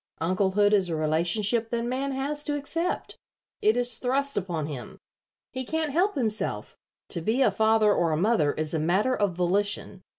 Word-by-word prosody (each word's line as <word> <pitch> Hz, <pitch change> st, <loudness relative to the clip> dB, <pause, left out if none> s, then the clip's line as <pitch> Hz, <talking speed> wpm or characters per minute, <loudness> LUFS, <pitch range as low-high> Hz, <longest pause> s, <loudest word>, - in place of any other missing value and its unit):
Unclehood 190 Hz, +4 st, +1 dB
is 190 Hz, -4 st, +2 dB
a 165 Hz, -, -2 dB
relationship 175 Hz, +9 st, +1 dB
that 235 Hz, 0 st, -2 dB
man 260 Hz, +3 st, -2 dB
has 285 Hz, +2 st, -2 dB
to 290 Hz, -1 st, 0 dB
accept. 330 Hz, +5 st, -3 dB, 0.4 s
It 215 Hz, +3 st, +3 dB
is 245 Hz, -2 st, +2 dB
thrust 275 Hz, +2 st, 0 dB
upon 175 Hz, -6 st, -2 dB
him. 135 Hz, -6 st, -8 dB, 0.5 s
He 260 Hz, 0 st, -4 dB
can't 315 Hz, +3 st, -2 dB
help 365 Hz, +7 st, +1 dB
himself. 220 Hz, -5 st, -1 dB, 0.3 s
To 170 Hz, -, -1 dB
be 230 Hz, +10 st, +1 dB
a -, -, +3 dB
father 220 Hz, -1 st, +3 dB
or 170 Hz, -4 st, +1 dB
a 155 Hz, -, 0 dB
mother 175 Hz, -6 st, +2 dB
is 155 Hz, 0 st, -2 dB
a 160 Hz, -, 0 dB
matter 190 Hz, +11 st, +1 dB
of 205 Hz, -6 st, -1 dB
volition. 190 Hz, +2 st, 0 dB
215 Hz, 175 wpm, -26 LUFS, 175-260 Hz, 0.5 s, It